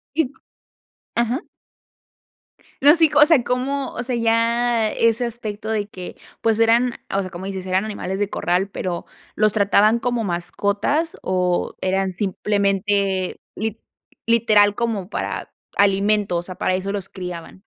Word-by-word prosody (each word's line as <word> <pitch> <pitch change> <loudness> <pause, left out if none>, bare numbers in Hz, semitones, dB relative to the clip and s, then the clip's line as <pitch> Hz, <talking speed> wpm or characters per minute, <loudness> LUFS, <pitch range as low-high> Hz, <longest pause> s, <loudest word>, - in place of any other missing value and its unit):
Y 315 -5 +1
co - - -28 0.7
ajá. 235 - 0 1.4
No, 290 +4 +7
sí. 325 -1 +5
O 295 0 +8
sea, 305 -7 +4
cómo 265 +2 -1
o - - -4
sea, 245 0 -2
ya 230 0 +2
ese 230 +2 +2
aspecto 220 -2 -5
de 210 -2 0
que, 185 -3 -8 0.2
pues, 225 -1 +2
eran 235 +2 +3 0.2
o 195 - +2
sea, 185 -2 -5
como 185 +1 -7
dices, 190 -1 -5
eran 185 +2 +1
animales 195 -3 -4
de 205 -1 0
corral. 180 +1 0
Pero, 180 -3 -4 0.3
¿los 215 -1 +3
trataban 210 +2 +4
como 240 -1 -1
mascotas 200 - -1
o 180 -1 0
eran 190 0 0
simplemente, 200 -1 0
lit 220 +1 -3 0.5
literal 215 -3 +4
como 220 -5 -2
para - - -4 0.2
alimento? 200 -1 +2
O - - -3
sea, 180 +1 -8
para 185 - 0
eso 190 +1 -2
los 200 -2 -4
criaban. 180 0 -8
210 Hz, 150 wpm, -21 LUFS, 190-235 Hz, 1.4 s, O